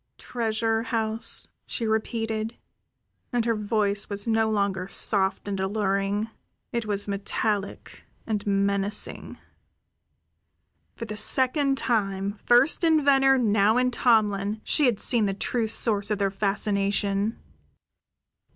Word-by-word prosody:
"Treasure 225 -1 -1
house?" 225 -1 0 0.2
she 230 - -3
repeated, 220 0 -2 0.7
and 240 -2 0
her 230 - +2
voice 210 -1 0
was 200 0 -2
no 225 -1 +1
longer 200 -3 -1
soft 195 0 +1
and 195 -1 -3
alluring; 200 +1 -1 0.4
it 235 -2 -3
was 205 -1 -1
metallic 200 0 -3 0.2
and 215 -2 -3
menacing. 200 0 -1 1.6
For 230 - -6
the 215 -1 -6
second 270 +5 +2
time, 200 -4 -1
first 265 +8 +4
in 320 -3 +3
Venner, 270 -1 +4
now 215 -2 +2
in 250 0 +2
Tomlin, 215 -4 +1
she 295 - +2
had 235 -5 0
seen 230 -4 +1
the 195 - -2
true 225 +3 -2
source 215 -2 +1
of 210 - 0
their 195 -1 0
fascination. 200 +1 -1
215 Hz, 120 wpm, -25 LUFS, 200-230 Hz, 1.6 s, first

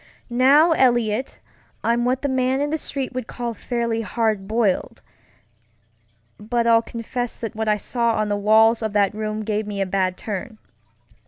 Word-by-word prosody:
Now, 275 +7 +5
Eliot, 240 -4 +1 0.4
I'm 235 +1 +1
what 255 +2 0
the - - +1
man 260 0 +1
in 290 +1 -1
the 315 - 0
street 275 -3 -4
would 255 -2 -4
call 240 -1 -4
fairly 235 0 -2
"hard 215 -3 -1
boiled," 215 -3 -1 1.4
but 235 +2 -1
I'll 230 -1 +5
confess 235 +1 -5
that 225 -1 -5
what 220 0 -2
I 210 - +3
saw 235 +2 0
on 215 0 0
the 205 - 0
walls 220 +3 +4
of 220 -2 -3
that 205 -1 +2
room 215 0 -3
gave 215 0 -2
me 205 -1 -4
a 195 - +1
bad 185 -1 -1
turn. 215 +2 -6
230 Hz, 170 wpm, -22 LUFS, 210-245 Hz, 1.4 s, Now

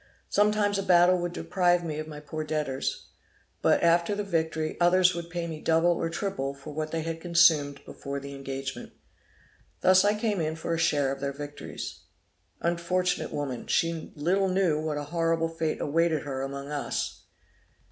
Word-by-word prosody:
Sometimes 205 -1 +2
a - - +1
battle 180 -1 +5
would 175 0 -2
deprive 175 -1 +1
me 155 -2 -3
of 155 - -5
my 150 -1 -8
poor 155 +1 -5
debtors; 150 -3 -3 0.5
but - - +3
after 170 +3 +3
the 205 - -2
victory, 160 -4 -1
others 180 +1 +5
would 170 0 -6
pay 175 -1 -3
me 160 -2 -6
double 165 +1 +3
or 165 -1 -1
triple 165 -7 -3
for 140 +2 -10
what 155 +1 -3
they 160 0 -2
had 165 0 -4
consumed 165 -5 +3
before 140 0 -6
the 140 0 -8
engagement. 135 0 -6 0.9
Thus 185 0 +6
I 205 +1 +2
came 210 -4 0
in 155 0 -1
for 165 +1 -3
a 165 - -1
share 145 -5 +2
of 135 - -4
their 140 0 -2
victories.' 145 +1 -7 0.6
Unfortunate 175 +1 0
woman! 140 -5 -4
she 165 -1 0
little 185 +6 +1
knew 185 -5 +2
what 155 -1 -2
a 145 - -3
horrible 165 +1 0
fate 165 -1 -2
awaited 160 +1 +1
her 135 -2 -4
among 140 +1 -5
us! 145 -1 -3
165 Hz, 175 wpm, -28 LUFS, 145-175 Hz, 0.9 s, Thus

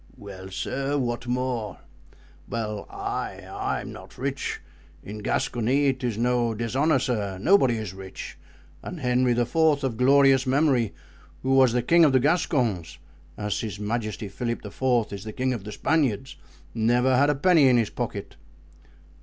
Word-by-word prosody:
"Well, 95 -2 -10
sir? 135 +8 -2
What 120 -2 -2
more?" 125 -4 -2 0.7
"Well—I—I'm 105 -3 -4
not - - -12
rich. - - -3 0.4
In 105 +2 -7
Gascony 125 +6 +1
'tis 125 -4 -3
no 120 -1 +1
dishonor, 130 +7 +1
sir, 105 -7 -2
nobody 135 - +4
is 110 -4 -5
rich; 95 -1 -8 0.5
and 180 - -7
Henry 125 -1 +2
IV., 120 +3 -1
of 145 -7 +2
glorious 135 +1 +5
memory, 130 -5 +2 0.5
who 130 +1 +1
was 130 -3 +5
the 125 -1 +1
king 170 +6 +5
of 145 -4 +5
the 130 - +5
Gascons, 125 - 0 0.4
as 105 -1 -2
His 105 -3 -5
Majesty 110 0 -3
Philip 120 +3 -4
IV. 120 +1 0
is 100 -1 -6
the 110 -1 -7
king 130 +2 0
of 110 -5 -6
the 105 - -6
Spaniards, 135 -2 0 0.4
never 120 +3 +2
had 140 +3 +4
a 145 - +2
penny 160 -1 +5
in 125 -1 +5
his 115 -3 0
pocket." 105 -8 -5
120 Hz, 145 wpm, -25 LUFS, 110-135 Hz, 0.7 s, glorious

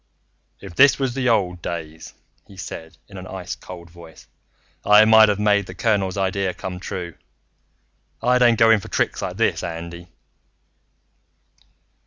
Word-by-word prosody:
"If 95 -3 -10
this 140 +11 +5
was 135 -3 -2
the 130 -1 0
old 90 -6 0
days," 80 -2 -7 0.3
he 100 - -16
said 80 -2 -9
in 100 - -12
an 90 0 -9
ice 95 -2 -6
cold 85 -2 -12
voice, 85 -2 -15 0.6
"I 105 +1 +6
might 110 -1 +7
of 105 - 0
made 100 -2 +1
the 95 - -10
colonel's 100 -3 0
idea 95 -1 -1
come 90 -1 -7
true. 90 -2 -6 1.1
I 125 +1 +2
don't 120 -2 +4
go 115 -1 +5
for - - -11
tricks - - -1
like - - -5
this, - - 0
Andy." 85 +1 -7
95 Hz, 150 wpm, -21 LUFS, 85-110 Hz, 1.1 s, might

